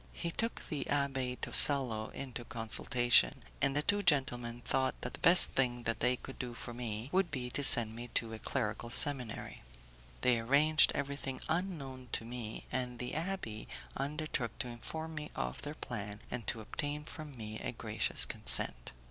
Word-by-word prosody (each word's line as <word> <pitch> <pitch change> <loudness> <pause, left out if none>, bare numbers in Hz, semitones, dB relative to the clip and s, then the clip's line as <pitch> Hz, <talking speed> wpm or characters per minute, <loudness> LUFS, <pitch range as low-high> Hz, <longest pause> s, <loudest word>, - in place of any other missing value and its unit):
He 170 - -3
took 230 +7 -2
the 150 - -3
Abbé 135 -3 0
Tosello 125 -7 +2
into 125 -3 -6
consultation, 120 +1 +2 0.2
and 135 - +2
the 145 - +1
two 205 +4 +2
gentlemen 120 -8 +1
thought 130 -1 0
that - - -5
the - - -7
best 175 +1 +9
thing 120 -2 0
they 115 +2 +1
could 135 - -11
do 125 -2 -5
for 120 - -7
me 115 0 -5
would 190 -1 +2
be 125 -4 -4
to 145 - -2
send 115 -4 +7
me 120 +1 -7
to 115 -1 0
a 110 - -7
clerical 115 -2 -3
seminary. 125 -1 +1 0.6
They 125 -2 +3
arranged 145 +6 +4
everything 140 -1 -3
unknown 150 -7 -3
to 115 - -1
me, 115 -2 -6
and 125 -1 -2
the 125 +1 -4
abbé 160 - -4 0.3
undertook 140 -3 -3
to 130 - -3
inform 160 +8 -6
me 150 -1 -6
of 60 0 -4
their - - -6
plan 105 0 -5
and 120 -4 -5
to 110 - -2
obtain 145 +6 -4
from 150 -3 -9
me 110 -1 -6
a - - -4
gracious - - -1
consent. - - +1
125 Hz, 170 wpm, -33 LUFS, 115-145 Hz, 0.6 s, best